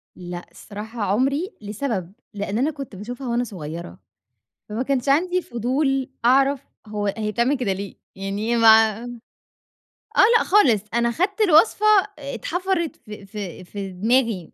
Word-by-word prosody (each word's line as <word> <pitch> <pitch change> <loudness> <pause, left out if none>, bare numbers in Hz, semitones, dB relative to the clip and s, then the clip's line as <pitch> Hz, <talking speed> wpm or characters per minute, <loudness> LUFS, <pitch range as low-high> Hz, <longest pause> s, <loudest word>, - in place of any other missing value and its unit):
لأ، 175 -1 -7
الصراحة 215 +2 -8
عمري، 270 - 0
لسبب 205 -4 -4 0.2
لإن 205 +1 -3
أنا 285 +5 +1
كنت 275 -8 -8
باشوفها 245 +6 -7
وأنا 240 +1 0
صغيرة، 160 - -7 0.7
فما 225 +5 -2
كانش 275 0 -1
عندي 360 +5 +2
فضول 265 +2 -1 0.2
أعرف 270 +2 +4 0.3
هو 210 -1 -3
هي 215 -1 -2
بتعمل 245 +6 +1
كده 210 -7 0
ليه، 200 0 -7 0.2
يعني 200 +4 -2
ما 220 -1 +5 1.1
آه، - - +8 0.2
لأ، - - +1
خالص، 260 - +4
أنا 235 0 +2
خدت 390 - -1
الوصفة 400 +3 +4 0.3
اتْحفرت 340 +4 -2
في 210 -2 -11
في 195 -3 -7
في 195 +1 -6
دماغي، 220 -1 0
235 Hz, 135 wpm, -22 LUFS, 205-275 Hz, 1.1 s, آه